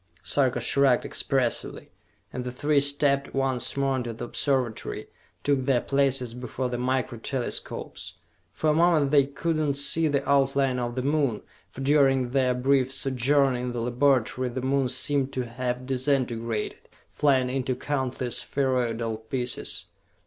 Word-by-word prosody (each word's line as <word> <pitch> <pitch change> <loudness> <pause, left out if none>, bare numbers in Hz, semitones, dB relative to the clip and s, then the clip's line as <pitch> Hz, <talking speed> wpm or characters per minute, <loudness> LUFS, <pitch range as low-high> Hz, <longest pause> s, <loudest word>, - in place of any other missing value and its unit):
Sarka 130 -3 +1
shrugged 135 +1 +3
expressively, 130 -4 -1 0.4
and 125 - -4
the 125 - -4
three 145 +3 +2
stepped 140 -1 0
once 135 -1 0
more 135 -1 +1
into 120 -2 -3
the 120 +2 -6
Observatory, 125 -3 -1 0.4
took 140 -3 +1
their 130 -3 +3
places 135 -3 +1
before 125 +1 -4
the 120 - -3
Micro 130 -1 -1
Telescopes. 125 +1 -5 0.4
For 155 - +1
a - - +2
moment 160 -3 +3
they 140 -2 +5
could 160 +3 -2
not 150 -3 0
see 140 +3 +2
the 140 -2 -1
outline 135 -2 +2
of 120 -1 -3
the 130 - -2
Moon, 140 -6 0 0.3
for 135 - -9
during 135 -3 +3
their 130 -2 +2
brief 130 +1 +2
sojourn 135 0 +2
in 125 0 -3
the 120 - -3
laboratory 125 +1 +1
the 125 +1 -5
Moon 135 -1 +1
seemed 140 0 +1
to 130 -1 -2
have 125 +1 -4
disintegrated, 125 -4 -1 0.2
flying 130 -3 +2
into 130 -1 -1
countless 130 -4 -2
spheroidal 120 -5 -1
pieces. 120 +2 -4
130 Hz, 150 wpm, -26 LUFS, 125-140 Hz, 0.4 s, they